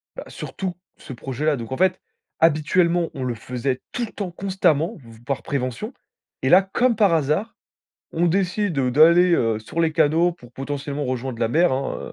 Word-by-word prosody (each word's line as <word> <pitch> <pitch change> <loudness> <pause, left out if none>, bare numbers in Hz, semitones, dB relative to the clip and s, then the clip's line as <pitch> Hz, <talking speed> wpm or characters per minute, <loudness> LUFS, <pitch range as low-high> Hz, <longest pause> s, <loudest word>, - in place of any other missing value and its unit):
Bah, - - -7
surtout, 185 -3 -5 0.2
ce 130 - -10
projet-là, 135 +4 -2
donc 115 +1 -7
en 130 - -2
fait, 185 0 +2 0.4
habituellement, 170 +2 +2
on 130 - -5
le 120 -2 -2
faisait 125 +3 -3
tout 240 -1 -2
le - - -12
temps, 190 -4 -5
constamment 175 -4 0
v 115 -3 -15
par 140 - -3
prévention. 140 - -3 0.5
Et - - +1
là, 185 +2 +8
comme 235 +5 +1
par 200 -5 +3
hasard, 155 +8 0 0.6
on 170 +2 +1
décide, 185 -1 0
heu, 130 -2 +1
d'aller, 170 +5 +6
heu, 115 -5 +1
sur 135 +10 -4
les 160 -1 +2
canaux 160 +3 +3
pour 120 -7 -17
potentiellement 140 +2 -4
rejoindre 130 -1 -3
la 115 - +2
mer, 170 +4 +3
hein, 135 +1 -3
155 Hz, 185 wpm, -22 LUFS, 130-180 Hz, 0.6 s, là